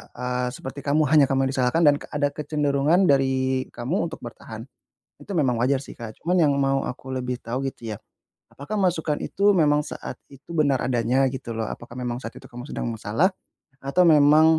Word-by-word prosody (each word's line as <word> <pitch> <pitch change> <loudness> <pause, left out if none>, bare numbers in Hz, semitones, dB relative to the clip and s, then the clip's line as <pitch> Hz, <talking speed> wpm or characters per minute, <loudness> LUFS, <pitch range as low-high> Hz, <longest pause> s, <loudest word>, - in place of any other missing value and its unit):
e 125 - -9
eee, 125 0 -1
seperti 135 +2 -7
kamu 145 +2 +3
hanya 150 -3 +7
kamu 135 0 +2
disalahkan 130 +5 +1
dan 145 - +6 0.2
ada 145 -1 +2
kecenderungan 150 +2 +1
dari 130 -1 +1
kamu 125 +10 -2
untuk 160 - -8
bertahan. 115 -1 -9 0.6
Itu - - -8
memang 130 -5 +2
wajar 135 +1 +2
sih - - -11
Kak, 110 -3 -9
cuman 180 +2 +1
yang 145 -2 +4
mau 135 0 +1
aku 130 +1 -7
lebih 125 -1 -3
tahu 125 +4 -3
gitu 115 -4 -7
ya, - - -7 0.6
apakah 175 +10 -5
masukan 165 -5 +1
itu 200 +1 +1
memang 150 -2 +3
saat 150 - -7 0.2
itu 140 +4 -16
benar 145 -4 +2
adanya 125 +2 +2
gitu 130 -2 -5
loh, 110 - -2
apakah 120 +1 -8
memang 125 0 -3
saat 115 - -7
itu - - -14
kamu 125 +4 -10
sedang - - -3
masalah 115 - +1 0.5
atau 140 +7 +1
memang 155 +1 +6
135 Hz, 190 wpm, -24 LUFS, 125-150 Hz, 0.6 s, hanya